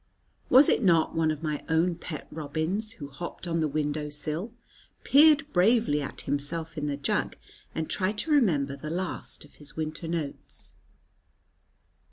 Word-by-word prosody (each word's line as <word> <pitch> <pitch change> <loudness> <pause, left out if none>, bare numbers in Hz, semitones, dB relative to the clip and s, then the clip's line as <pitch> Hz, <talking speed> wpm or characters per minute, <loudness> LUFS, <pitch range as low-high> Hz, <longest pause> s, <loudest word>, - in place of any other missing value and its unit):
Was 265 +3 +8
it - - +3
not 170 -6 +3
one 160 -1 +2
of 155 0 -3
my 150 -2 -2
own 165 +2 +3
pet 165 -2 -7
robins, 160 +8 -2
who 145 -10 -8
hopped 170 +5 -7
on 165 0 0
the 155 - +2
window 150 0 -2
sill, 155 +8 -3 0.5
peered 305 +1 +6
bravely 190 -5 +3
at 135 - -5
himself 145 +4 -3
in 150 -2 -2
the 140 -1 -2
jug, 140 - -1 0.4
and 160 -1 -2
tried 200 +2 0
to 310 - -1
remember 155 - +3
the 150 +2 -7
last 180 +3 -3
of - - -18
his 145 -1 -9
winter 155 +1 -4
notes? 160 -4 -5
160 Hz, 160 wpm, -28 LUFS, 150-185 Hz, 0.5 s, Was